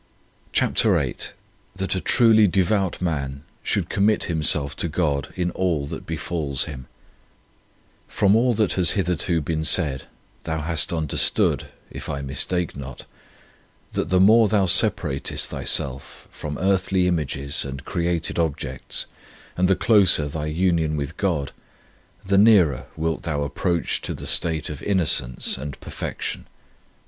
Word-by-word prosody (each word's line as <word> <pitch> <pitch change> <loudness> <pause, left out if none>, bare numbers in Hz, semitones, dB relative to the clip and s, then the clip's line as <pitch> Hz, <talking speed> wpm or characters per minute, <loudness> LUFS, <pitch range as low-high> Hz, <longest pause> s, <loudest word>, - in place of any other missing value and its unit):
CHAPTER - - +2
VIII - - -2 0.6
THAT 95 0 -2
A 95 - -2
TRULY 110 -3 +4
DEVOUT 95 0 0
MAN 70 -4 -3 0.2
SHOULD - - -1
COMMIT 105 +2 +1
HIMSELF 75 -3 +1
TO - - 0
GOD 75 -4 -1
IN 90 -1 -2
ALL 85 -7 -1
THAT - - -8
BEFALLS 75 -6 -2
HIM 65 -4 -8 1.2
FROM 100 +1 +2
all 120 +1 +2
that 105 -3 +1
has 90 -3 +6
hitherto 90 -2 0
been 80 +1 -3
said, 75 -4 +3 0.4
thou 80 -1 -3
hast 80 -1 0
under 80 -4 -3
stood, - - +3 0.2
if - - -8
I 70 0 -4
mistake 80 +6 -2
not, 65 -2 -9 0.9
that - - -3
the 90 0 +2
more 110 +4 +6
thou 105 -3 +2
separatest 70 -5 +3
thyself 70 0 -1
from 75 -2 -7
earthly 95 -1 +1
images 75 -5 0
and 70 0 -8
created 85 -2 -2
objects, 70 -5 -2 0.5
and 90 +1 +1
the 95 - +3
closer 95 -10 +4
thy 75 +1 -5
union 80 -1 0
with 70 +3 -5
God, 85 -9 -2 0.7
the 100 +1 +2
nearer 100 - +4
wilt 80 0 -2
thou 75 -3 -2
approach 85 +3 -2
to - - -5
the - - -9
state 80 -3 +1
of 75 -2 -7
innocence 80 -12 0
and 70 +1 -7
perfec - - -7
tion. - - -4
80 Hz, 140 wpm, -22 LUFS, 75-95 Hz, 1.2 s, has